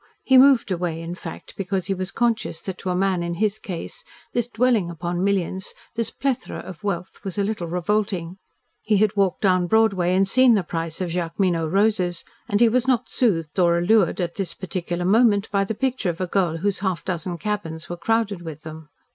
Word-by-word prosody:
He 265 - +4
moved 260 -5 +6
away, 175 -2 -2
in 165 +1 -5
fact, 180 - -9
because 190 -1 -2
he 195 - 0
was 185 0 -4
conscious 230 -6 -1
that 190 -2 -6
to 190 - -4
a 180 - 0
man 190 -1 +1
in 170 0 -3
his 210 +3 0
case, 185 - -6 0.3
this 240 -1 0
dwelling 235 -6 +2
upon 175 +2 -3
millions, 190 -1 -1 0.2
this 230 -1 -1
plethora 275 -3 -2
of 185 +2 -9
wealth, 185 -3 -4
was 195 -1 -5
a 200 - +2
little 200 -4 -2
revolting. 185 0 -1 0.4
He 215 -1 +2
had 210 0 +2
walked 195 -3 +1
down 185 -3 +3
Broadway 195 -4 +3
and 195 +1 +3
seen 255 +3 +6
the 200 - +1
price 165 0 -4
of 180 -2 -2
Jacqueminot 170 -1 0
roses, 190 -3 +1 0.2
and 205 - +2
he 235 - +6
was 250 +3 +1
not 250 -2 +1
soothed 170 -9 0
or 170 -1 +4
allured 195 +2 +3
at 175 -2 -1
this 195 -3 -4
particular 175 -1 -3
moment 210 0 +3
by 200 -1 +2
the 210 +3 -3
picture 255 -5 -1
of 170 - -4
a 185 - 0
girl 175 -3 0
whose 200 +3 -1
half 190 -5 -2
dozen 175 -1 -3
cabins 165 -4 -4
were 175 - -4
crowded 205 +1 0
with 160 -2 -8
them. 155 -1 -9
190 Hz, 205 wpm, -23 LUFS, 175-215 Hz, 0.4 s, moved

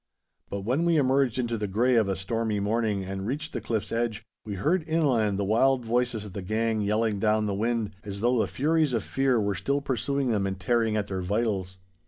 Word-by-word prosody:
But 100 - -4
when 125 +11 0
we 170 -1 +3
emerged 135 -3 +2
into 120 -3 -1
the 105 - -2
grey 120 +6 +2
of 110 -4 +3
a 95 - 0
stormy 105 +3 -1
morning 105 -1 0
and 95 +1 -5
reached 150 +5 -3
the - - -3
cliff's 110 -4 -2
edge, 115 -1 -1 0.2
we 105 -3 -5
heard 160 - +1
inland 130 -11 +2
the 100 - -1
wild 125 +4 +3
voices 120 -2 0
of 100 - -9
the 100 - -4
gang 110 +3 0
yelling 105 0 0
down 110 +1 +2
the 100 - -1
wind, 110 +1 -1
as 100 -2 -6
though 120 +2 +2
the - - +2
furies 155 0 +1
of 115 -3 0
fear 135 -3 +1
were 100 -1 0
still 140 +8 -1
pursuing 140 0 -1
them 100 -3 +1
and 95 -1 -4
tearing 115 +1 +1
at 105 - 0
their 95 -2 -4
vitals. 95 -1 -1
115 Hz, 220 wpm, -27 LUFS, 100-125 Hz, 0.2 s, we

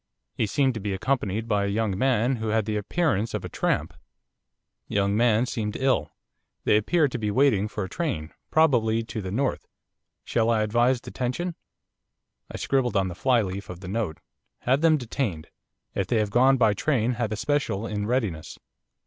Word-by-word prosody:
He 110 - 0
seemed 135 +4 +2
to 110 - -5
be 100 -1 -2
accompanied 110 -1 -1
by 105 -3 +1
a - - 0
young 105 -1 0
man 125 +2 +2
who 110 0 -4
had 110 -1 +1
the 110 0 -2
appearance 115 - 0
of - - -4
a - - -5
tramp. 80 +3 -1 0.9
Young 100 0 +1
man 115 +1 +3
seemed 110 -4 -3
ill. 130 - +1 0.5
They - - +4
appeared 145 +7 +2
to 125 - -3
be 105 -1 -1
waiting 110 -3 +3
for 105 -1 -4
a - - -4
train, 90 - -3 0.2
probably 115 -8 +3
to 115 -1 -5
the 95 - -5
North. 130 +7 -1 0.6
Shall 115 -1 +1
I 110 -2 +3
advise 120 +4 +2
detention?' 130 +10 -3 1.0
I - - -6
scribbled 130 -4 0
on 95 -1 +1
the - - -5
flyleaf 100 -3 0
of 90 0 -8
the 95 - -8
note. 95 -6 -2 0.4
'Have 130 +4 +2
them 160 -1 +5
detained. 115 - -3 0.4
If 95 - -1
they 120 - +1
have 105 -2 0
gone 130 +4 +5
by 110 -4 +4
train 120 +1 +1
have 120 -3 -2
a - - -1
special 115 -5 -1
in 105 -2 -3
readiness. 110 - -2
110 Hz, 185 wpm, -26 LUFS, 100-130 Hz, 1.0 s, them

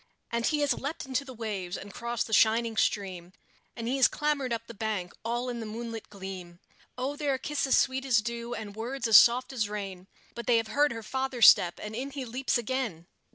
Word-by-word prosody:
And 235 0 0
he 300 -1 +1
has 290 - +3
leaped 290 +3 -5
into 265 +1 -1
the 270 - -10
waves, 200 -5 -4
and 200 -1 -10
crossed 235 0 -2
the 220 - -6
shining 225 +1 +4
stream, 185 -5 -1 0.4
And 230 -1 -5
he 260 +3 0
has 265 - +6
clambered 295 -4 -1
up 230 0 -2
the 235 - -10
bank, 205 -4 -3
all 240 +2 -2
in 240 -1 -3
the 225 - -5
moonlight 225 0 -6
gleam; 190 -3 -8 0.4
Oh, 265 +3 -2
there 290 -2 0
are - - -3
kisses 280 -1 +1
sweet 265 +1 +1
as 240 -5 +3
dew, 235 +1 -4
and 210 -3 -7
words 240 +3 -3
as 220 -3 +9
soft 250 +3 +5
as 220 -5 -1
rain 195 -3 -6 0.3
But 235 -1 -7
they 240 - +5
have 225 -1 -1
heard 290 +4 +3
her 225 -1 -6
father's 260 -2 +3
step, 175 -1 +6
and 210 +1 -6
in 260 +4 -3
he 275 -2 -5
leaps 255 +3 0
again! 235 -8 -3
235 Hz, 220 wpm, -29 LUFS, 210-260 Hz, 0.4 s, as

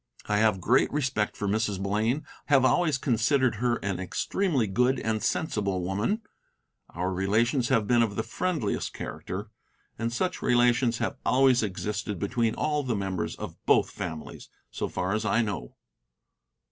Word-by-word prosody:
I 105 - +1
have 105 -3 +3
great 120 +9 +3
respect 130 -7 -1
for 105 - -2
Mrs. 105 -1 0
Blaine, 110 +8 0 0.2
have 135 -3 +5
always 155 +1 +3
considered 130 -1 +2
her 120 +1 +1
an 95 -2 -1
extremely 135 - 0
good 125 +6 +2
and 110 -2 -1
sensible 100 - -1
woman; 105 - -1 0.7
our 90 +2 -2
relations 115 +7 +1
have 110 -2 +3
been 120 +3 +3
of 110 -3 0
the 110 - -1
friendliest 145 - -2
character, 105 +4 -6 0.5
and 115 +1 -1
such 180 +10 -2
relations 120 -1 +3
have 140 - -2
always 130 -1 +4
existed 105 0 -3
between 115 +4 0
all 150 -1 0
the 125 -5 -1
members 95 -3 -2
of - - -8
both - - +4
families, 80 -1 -7 0.2
so - - -3
far 95 +2 -2
as 110 0 0
I 115 +2 +2
know. 95 - -5
115 Hz, 155 wpm, -27 LUFS, 100-130 Hz, 0.7 s, have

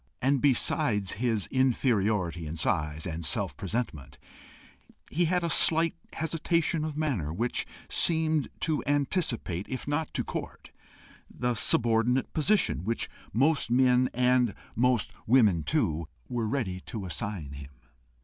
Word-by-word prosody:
And 135 0 +2
besides 110 -7 +2
his 115 -2 -1
inferiority 105 - +1
in 75 - -5
size 80 -4 -1
and 85 -1 -4
self 85 -1 -1
presentment, 80 - -4 0.9
he 170 +4 +2
had 180 +1 +1
a 170 - 0
slight 165 0 +5 0.2
hesitation 165 0 0
of 155 -1 -4
manner, 125 - -1
which 115 +9 -1 0.2
seemed 160 -3 +1
to 155 -2 0
anticipate, 140 - 0
if 130 0 -5
not 145 +2 -1
to - - 0
court, - - -7 0.6
the 125 0 -1
subordinate 115 +2 +1
position 160 - +1
which 115 +4 -2 0.2
most 140 +6 +2
men, 125 0 +4
and 125 -2 +2 0.2
most 125 -1 +2 0.2
women 105 -8 +4
too, 85 - 0 0.2
were 120 -3 -2
ready 105 -8 -2
to 105 -4 -5
assign 90 -5 -5
him. 70 -1 -9
120 Hz, 130 wpm, -28 LUFS, 95-145 Hz, 0.9 s, slight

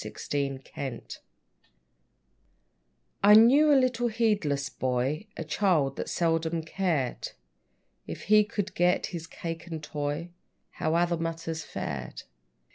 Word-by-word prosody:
=Jemmy - - -8 0.5
String= 130 -4 -6 2.2
I 205 +1 +8
knew 270 +8 +7
a 285 - +6
little 245 -2 +2
heedless 210 -12 0
boy, 130 - -2
A - - -3
child 155 -4 +1
that - - -4
seldom 165 -1 0
cared, 160 -7 -2 0.7
If - - -7
he 210 0 +5
could 205 -1 -4
get 175 +1 +2
his 165 -2 -5
cake 165 0 -6
and 160 -3 -6
toy, 150 +3 -4 0.4
How 155 +1 -1
other 170 0 +2
matters 165 -1 -4
fared. 65 - -6
165 Hz, 120 wpm, -28 LUFS, 150-205 Hz, 2.2 s, I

